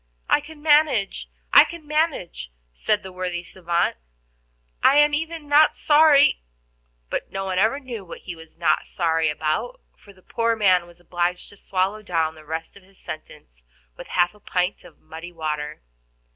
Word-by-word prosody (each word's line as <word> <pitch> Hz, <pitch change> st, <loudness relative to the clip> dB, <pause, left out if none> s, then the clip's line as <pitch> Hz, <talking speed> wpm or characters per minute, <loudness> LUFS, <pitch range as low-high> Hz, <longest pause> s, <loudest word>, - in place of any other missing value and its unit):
"I -, -, +3 dB
can 295 Hz, 0 st, -13 dB
manage, 290 Hz, -, +2 dB, 0.2 s
I -, -, +10 dB
can 335 Hz, -2 st, -9 dB
manage," 295 Hz, -, -1 dB, 0.2 s
said 205 Hz, -, 0 dB
the 190 Hz, -, -9 dB
worthy 180 Hz, -1 st, -4 dB
savant. 175 Hz, -1 st, -1 dB, 0.8 s
"I 270 Hz, -, +5 dB
am 295 Hz, 0 st, +5 dB
even 320 Hz, 0 st, -3 dB
not 295 Hz, +2 st, +5 dB
sorry 295 Hz, -, +5 dB, 0.3 s
" -, -, -43 dB
But -, -, -3 dB
no 195 Hz, 0 st, -4 dB
one 185 Hz, -1 st, -1 dB
ever 225 Hz, +7 st, +2 dB
knew 245 Hz, -7 st, -7 dB
what 175 Hz, -, -10 dB
he 180 Hz, -, -7 dB
was 160 Hz, 0 st, -16 dB
not 170 Hz, -, +1 dB
sorry 165 Hz, -3 st, 0 dB
about, 155 Hz, -, -2 dB, 0.2 s
for 205 Hz, -, -18 dB
the 185 Hz, -2 st, -23 dB
poor 230 Hz, -1 st, 0 dB
man 185 Hz, -5 st, +3 dB
was 175 Hz, 0 st, -18 dB
obliged 175 Hz, +1 st, -2 dB
to -, -, -16 dB
swallow 195 Hz, +3 st, -1 dB
down 165 Hz, -6 st, -1 dB
the 155 Hz, -1 st, -15 dB
rest 160 Hz, +2 st, -6 dB
of 200 Hz, -, -15 dB
his 190 Hz, +1 st, -22 dB
sentence 150 Hz, -, -10 dB, 0.3 s
with -, -, -10 dB
half 175 Hz, -1 st, +1 dB
a 210 Hz, -, -20 dB
pint 180 Hz, -1 st, -2 dB
of 175 Hz, -3 st, -16 dB
muddy 165 Hz, +2 st, -10 dB
water. 150 Hz, -, -4 dB
185 Hz, 175 wpm, -23 LUFS, 165-260 Hz, 0.8 s, I